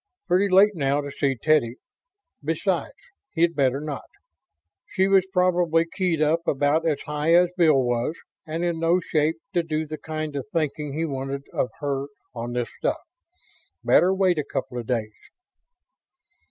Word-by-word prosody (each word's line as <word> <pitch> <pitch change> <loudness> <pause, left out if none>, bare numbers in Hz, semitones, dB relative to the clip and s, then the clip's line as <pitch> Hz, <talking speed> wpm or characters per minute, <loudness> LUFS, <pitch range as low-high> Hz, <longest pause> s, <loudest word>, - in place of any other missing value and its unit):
Pretty 195 +3 +3
late 200 +3 +6
now 140 -4 0
to 145 -1 -5
see 135 -1 0
Teddy... 125 -3 +2 0.7
besides, - - -1 0.4
he'd 170 -1 +2
better 135 -1 +2
not. 150 -1 -6 0.8
She 190 +1 +1
was 195 -1 +4
probably 175 -3 +2
keyed 175 -5 +1
up 155 +2 +2
about 145 +4 +2
as 150 -3 0
high 150 +2 +1
as 175 0 +4
Bill 160 -6 +4
was, 120 +5 -1 0.3
and 160 +2 -3
in 170 -2 -1
no 165 +2 +3
shape 155 -2 0 0.2
to 175 - +2
do 160 -1 -2
the 155 0 -7
kind 155 -2 -5
of 140 - -4
thinking 150 -3 -2
he 160 +3 -1
wanted 135 -1 -4
of 125 - 0
her 140 -1 -2 0.3
on 120 0 -5
this 120 -1 -2
stuff. - - 0 0.9
Better 180 - +5
wait 185 -3 +2
a - - 0
couple 125 -3 -4
of 115 - -7
days. 110 -4 -2
155 Hz, 160 wpm, -24 LUFS, 140-170 Hz, 0.9 s, late